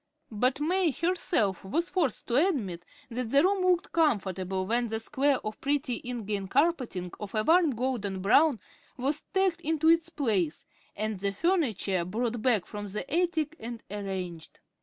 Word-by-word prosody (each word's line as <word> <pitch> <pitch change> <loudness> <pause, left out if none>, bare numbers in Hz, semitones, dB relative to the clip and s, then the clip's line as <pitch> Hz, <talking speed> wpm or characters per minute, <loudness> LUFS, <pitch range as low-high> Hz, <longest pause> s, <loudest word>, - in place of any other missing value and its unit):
But 250 +5 +1
May 350 +3 +2
herself 300 - 0
was 330 - -1
forced 315 - 0
to 265 +9 +3
admit 190 - -3 0.3
that 240 0 -3
the 280 +4 +5
room 385 +1 +2
looked 365 +1 +2
"comfortable" 190 - 0
when 235 +4 +1
the 220 0 -2
square 270 +4 +1
of 215 0 -5
pretty 280 -3 -1
ingrain 215 -5 -3
carpeting 255 - 0
of 210 0 -6
a 215 - +2
warm 325 -1 +4
golden 225 -6 -2
brown 235 +7 +4 0.4
was 280 +4 -1
tacked 380 -3 +1
into 320 0 +2
its 330 0 +4
place, 205 - -1 0.3
and 215 -1 -2
the 200 +1 0
furniture 220 - 0
brought 225 +5 -2
back 225 -7 +2
from 205 +2 -6
the 210 +5 -4
attic 330 -3 +1
and 230 0 -7
arranged. 190 -5 -5
245 Hz, 160 wpm, -28 LUFS, 200-320 Hz, 0.4 s, the